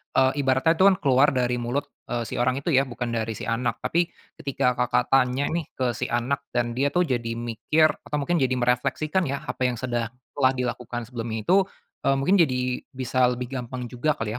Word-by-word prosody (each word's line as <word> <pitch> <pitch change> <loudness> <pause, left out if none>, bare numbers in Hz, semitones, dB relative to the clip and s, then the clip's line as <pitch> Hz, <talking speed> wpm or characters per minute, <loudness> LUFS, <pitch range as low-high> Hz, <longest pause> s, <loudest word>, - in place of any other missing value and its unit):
eee, 130 0 +5
ibaratnya 135 +3 +3
itu 190 - +7
kan 195 - +6
keluar 135 0 +5
dari 125 -1 +1
mulut, 120 +4 -1 0.2
eee, 120 -1 -2
si 110 - -5
orang 125 +1 +2
itu 170 - 0
ya 135 -1 +3
bukan 120 -1 -4
dari 110 0 -3
si - - -7
anak 115 +2 -1
tapi 170 +1 +1 0.3
ketika 135 -2 +1
Kakak 125 0 +1
tanya 130 0 +3
nih 165 -2 -2
ke 125 -2 0
si - - -3
anak 120 +4 0 0.2
dan 120 -1 +1
dia 130 +4 +1
tuh 180 - +4
jadi 120 -6 -2
mikir 120 +7 +2
atau - - -5
mungkin 155 +4 +1
jadi 130 -2 +2
merefleksikan 135 +8 0
ya 140 +1 -3
apa 125 - -1
yang 125 - -1
sedang 120 -1 -2 0.2
telah 130 -2 +3
dilakukan 125 -1 -3
sebelumnya 115 -2 -5
itu, - - +7 0.5
eee, 135 - +4
mungkin 160 +9 +3
jadi 125 -5 +1 0.2
bisa 130 -1 +2
lebih 125 0 -3
gampang 125 0 -6
juga 140 +4 0
kali 115 -2 -3
125 Hz, 205 wpm, -25 LUFS, 120-140 Hz, 0.5 s, itu